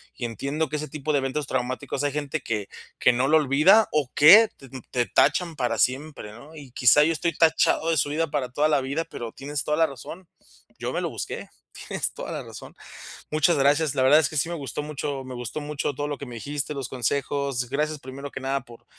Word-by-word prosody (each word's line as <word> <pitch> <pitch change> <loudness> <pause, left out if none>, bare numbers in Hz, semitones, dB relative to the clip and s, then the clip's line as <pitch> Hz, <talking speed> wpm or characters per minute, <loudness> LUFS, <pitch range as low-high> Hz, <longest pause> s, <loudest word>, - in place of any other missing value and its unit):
y - - -8
entiendo 140 +7 -3
que 155 - -2
ese 155 +1 -5
tipo 150 0 -4
de - - +3
eventos 135 +2 -3
traumáticos 130 +2 -3
hay 145 - 0
gente 150 +1 -3
que 105 -5 -3 0.3
que 125 - +5
no 125 +2 +1
lo 160 +2 +5
olvida 155 +10 +5
o 145 -4 0
que 205 +10 +8
te 135 - -15 0.2
te 120 -1 +1
tachan 170 +5 +2
para 120 -3 -1
siempre, 130 -1 -1
¿no?, 140 +8 -14
y 140 -5 -11
quizá 125 +4 +5
yo 160 - +2
estoy 170 +1 -1
tachado 160 0 +3
de 165 - +1
su 145 - +1
vida 160 +2 0
para 135 -4 -1
toda 150 +4 +1
la 150 - +3
vida, 140 +5 -2
pero 115 -1 -7
tienes 145 +1 -4
toda 150 - 0
la 165 - +5
razón, 165 +6 -10 0.5
yo - - -3
me - - -1
lo - - -2
busqué, - - -6 0.4
tienes - - -2
toda - - -7
la - - -4
razón. - - -11 0.6
Muchas 155 +2 +3
gracias, 145 +1 +2
la 130 - +1
verdad 145 +4 +6
es 140 - +1
que 155 - -8
sí 165 - +1
me 170 - -3
gustó 140 0 -5
mucho 145 -2 -4
me 130 -1 -8
gustó 120 +5 -5
mucho 145 -1 -3
todo 145 +2 -3
lo 145 - -4
que 140 - -7
me 120 - -9
dijiste, 145 +4 -3
los 135 -2 -4
consejos, 135 0 -1
gracias 150 +1 -1
primero 140 +1 -8
que - - -7
nada 135 +1 -1
por 120 -3 -16
145 Hz, 230 wpm, -25 LUFS, 130-155 Hz, 0.6 s, que